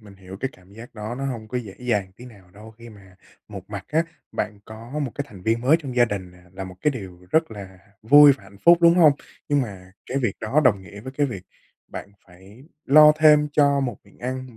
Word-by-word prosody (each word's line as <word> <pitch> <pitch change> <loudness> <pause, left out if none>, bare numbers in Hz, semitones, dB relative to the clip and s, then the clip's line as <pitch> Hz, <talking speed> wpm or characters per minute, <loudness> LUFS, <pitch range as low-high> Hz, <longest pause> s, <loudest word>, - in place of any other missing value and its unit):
mình 105 -2 -15
hiểu 95 0 -11
cái 135 - -1
cảm 90 +1 -21
giác 115 +3 -13
đó 110 +2 -6
nó 135 +2 -5
hông 115 -5 -6
có 125 - -3
dễ 105 -6 -9
dàng 105 -6 -2
tí 125 - -13
nào 100 -7 -16
đâu 105 +4 -14
khi 115 +2 -15
mà 95 -4 -17 0.3
một - - -11
mặt - - -6
á, 160 +2 +1 0.3
bạn 105 -1 -4
có 115 +6 -9
một 140 -5 -3
cái 145 - -4
thành 95 -3 -14
viên 115 +2 0
mới 140 +6 +4
trong 130 -4 -7
gia 120 - +6
đình 100 -5 -5
nè 90 - -19
là 95 0 -7
một 95 -1 -10
cái 150 - +2
điều 95 -8 -9
rất 160 -3 +1
là 95 -3 -10 0.2
vui 145 +5 +8
và 120 - -9
hạnh 100 0 -17
phúc, 170 0 +7
đúng 170 0 +6
hông? 160 -5 +6 0.4
Nhưng 145 -1 +2
mà 95 -5 -9
cái 135 - -2
việc 120 -7 -1
đó 130 +8 +1
đồng 105 -6 +3
nghĩa 100 +2 -12
với 130 +4 -9
cái 145 +1 0
việc 100 -9 -7 0.5
bạn - - -8 0.2
phải 95 +7 -17 0.2
lo 150 +2 +7
thêm 150 -1 +5
cho 140 -1 +3
một 125 -6 -3
miệng - - -23
ăn, 130 -1 -6
115 Hz, 245 wpm, -23 LUFS, 100-135 Hz, 0.5 s, vui